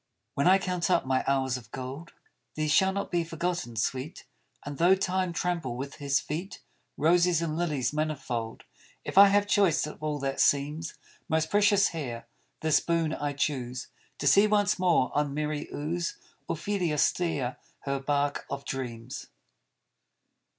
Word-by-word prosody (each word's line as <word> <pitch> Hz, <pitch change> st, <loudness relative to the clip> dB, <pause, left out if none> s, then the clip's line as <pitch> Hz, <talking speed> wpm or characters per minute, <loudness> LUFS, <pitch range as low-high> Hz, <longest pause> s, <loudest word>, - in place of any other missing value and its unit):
When 140 Hz, -, +1 dB
I 190 Hz, +1 st, +7 dB
count 180 Hz, -2 st, -2 dB
up 180 Hz, -, +2 dB
my 130 Hz, 0 st, +1 dB
hours 130 Hz, -2 st, +1 dB
of 115 Hz, -4 st, -13 dB
gold, 135 Hz, +7 st, -7 dB, 0.4 s
These 155 Hz, -1 st, 0 dB
shall 190 Hz, +4 st, +4 dB
not 200 Hz, +1 st, -4 dB
be 175 Hz, -1 st, +1 dB
forgotten, 165 Hz, -6 st, -3 dB
sweet; 130 Hz, -, -3 dB, 0.4 s
And 145 Hz, -1 st, -6 dB
though 180 Hz, +3 st, +6 dB
Time 185 Hz, -1 st, -1 dB
trample 170 Hz, -8 st, -2 dB
with 140 Hz, +1 st, -6 dB
his 140 Hz, -1 st, +1 dB
feet 170 Hz, +6 st, -5 dB, 0.4 s
Roses 175 Hz, +2 st, +3 dB
and 165 Hz, -2 st, -2 dB
lilies 150 Hz, -7 st, -1 dB
manifold 130 Hz, -7 st, -3 dB, 0.4 s
If -, -, -5 dB
I 200 Hz, -, +10 dB
have 205 Hz, +1 st, +3 dB
choice 200 Hz, -7 st, +3 dB
of 150 Hz, -, -9 dB
all 150 Hz, -1 st, -1 dB
that 135 Hz, -1 st, -3 dB
seems 150 Hz, +3 st, +1 dB, 0.3 s
Most 160 Hz, 0 st, 0 dB
precious 205 Hz, -1 st, +4 dB
here, 125 Hz, -9 st, -5 dB, 0.4 s
this 155 Hz, -2 st, +4 dB
boon 165 Hz, -2 st, 0 dB
I 145 Hz, -2 st, -2 dB
choose, 130 Hz, -3 st, -2 dB, 0.3 s
To -, -, -5 dB
see 200 Hz, +9 st, +6 dB
once 205 Hz, -1 st, +2 dB
more 175 Hz, -8 st, +2 dB
on 145 Hz, -1 st, 0 dB
merry 150 Hz, 0 st, -3 dB
Ouse 170 Hz, +4 st, -3 dB, 0.3 s
Ophelia 170 Hz, -2 st, -1 dB
steer 145 Hz, -6 st, 0 dB, 0.2 s
her 140 Hz, 0 st, -2 dB
bark 145 Hz, +1 st, -1 dB
of 140 Hz, 0 st, -5 dB
dreams. 125 Hz, -2 st, -5 dB
155 Hz, 155 wpm, -28 LUFS, 140-175 Hz, 0.4 s, I